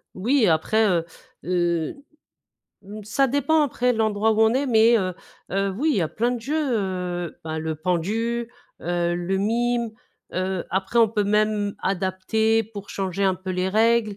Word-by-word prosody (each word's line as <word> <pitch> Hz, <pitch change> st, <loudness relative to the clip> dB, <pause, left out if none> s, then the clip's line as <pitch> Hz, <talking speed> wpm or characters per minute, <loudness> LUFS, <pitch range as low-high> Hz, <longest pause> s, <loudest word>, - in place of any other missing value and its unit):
Oui 240 Hz, +6 st, +2 dB
après, 185 Hz, +7 st, +2 dB
heu, 170 Hz, -3 st, +1 dB, 0.4 s
heu, 175 Hz, -3 st, 0 dB, 0.9 s
mmh 210 Hz, +2 st, -9 dB
ça 240 Hz, +7 st, +2 dB
dépend 290 Hz, +4 st, +2 dB
après 250 Hz, -3 st, +1 dB
l'endroit 220 Hz, -1 st, +1 dB
où 220 Hz, -, 0 dB
on 220 Hz, +1 st, +4 dB
est 270 Hz, +2 st, +1 dB
mais, 230 Hz, -1 st, +5 dB
heu, 185 Hz, -2 st, -2 dB, 0.4 s
heu, 195 Hz, +1 st, +1 dB
oui 305 Hz, +7 st, +1 dB
il -, -, 0 dB
y -, -, +2 dB
a 160 Hz, -, -1 dB
plein 235 Hz, +8 st, 0 dB
de 245 Hz, -, -3 dB
jeux, 275 Hz, +7 st, -3 dB, 0.2 s
heu, 180 Hz, -3 st, -3 dB
ben 160 Hz, 0 st, -3 dB
le 160 Hz, 0 st, -3 dB
pendu, 220 Hz, +8 st, -1 dB, 0.3 s
heu, 175 Hz, 0 st, -1 dB
le 175 Hz, +2 st, -1 dB
mime, 235 Hz, +3 st, 0 dB, 0.4 s
heu, 185 Hz, -1 st, -2 dB
après 190 Hz, +5 st, 0 dB
on 230 Hz, -1 st, +6 dB
peut 210 Hz, -2 st, 0 dB
même 210 Hz, 0 st, +1 dB
adapter 195 Hz, +4 st, +1 dB
pour 200 Hz, -2 st, -10 dB
changer 195 Hz, 0 st, -3 dB
un 190 Hz, -, +3 dB
peu 185 Hz, +1 st, -7 dB
les 185 Hz, +1 st, 0 dB
règles. 220 Hz, 0 st, +2 dB
205 Hz, 175 wpm, -23 LUFS, 185-225 Hz, 0.9 s, on